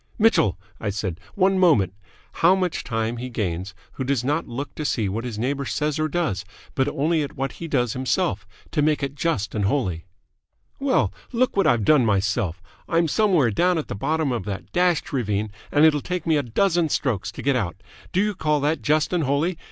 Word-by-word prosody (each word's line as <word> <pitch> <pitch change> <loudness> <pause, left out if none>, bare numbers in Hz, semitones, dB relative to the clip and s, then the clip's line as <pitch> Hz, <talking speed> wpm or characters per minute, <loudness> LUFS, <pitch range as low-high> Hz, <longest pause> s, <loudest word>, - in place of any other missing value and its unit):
"Mitchell," 210 - +3 0.2
I 105 - -2
said, 95 -4 -3 0.2
"one 190 -1 +3
moment. 115 - +4 0.5
How 175 +3 +6
much 185 -3 -1
time 115 0 -2
he 125 +2 -5
gains 95 -4 -3 0.2
who 130 - -4
does 130 -2 0
not 150 +5 0
look 135 +5 -5
to 155 - -5
see 115 -7 0
what 110 +4 -3
his 115 -4 -5
neighbour 135 +5 -1
says 150 +2 -1
or 155 - +1
does, 155 - -1 0.3
but 135 0 +1
only 155 +3 +1
at 145 - -5
what 135 0 -2
he 170 - -7
does 125 -6 +1
himself, 105 -7 -1 0.2
to 150 - +1
make 150 -1 +2
it 140 0 -2
just 145 -8 -1
and 105 -3 0
holy." 95 - -1 0.7
"Well, 275 -1 +1 0.2
look 255 +1 +1
what 195 - +3
I've 115 -4 +3
done 150 -4 +5
myself! 100 -4 0 0.3
I'm 165 0 +3
somewhere 175 - +3
down 180 - +2
at 155 - -3
the - - -2
bottom 155 +6 0
of 120 -6 -2
that 100 -1 -6
dashed 180 -4 +1
ravine, 105 -5 -1 0.2
and 150 +1 +5
it'll 150 -2 +4
take 180 +1 -3
me 160 -2 +3
a 145 - +3
dozen 165 - +1
strokes 105 -9 -1
to - - -8
get 140 -1 +2
out. 95 -5 -3 0.3
Do 185 +2 +2
you 210 0 0
call 150 -5 +1
that 150 +3 0
just 155 +3 +1
and 175 -3 +2
holy? 155 +6 0
140 Hz, 205 wpm, -23 LUFS, 110-165 Hz, 0.7 s, How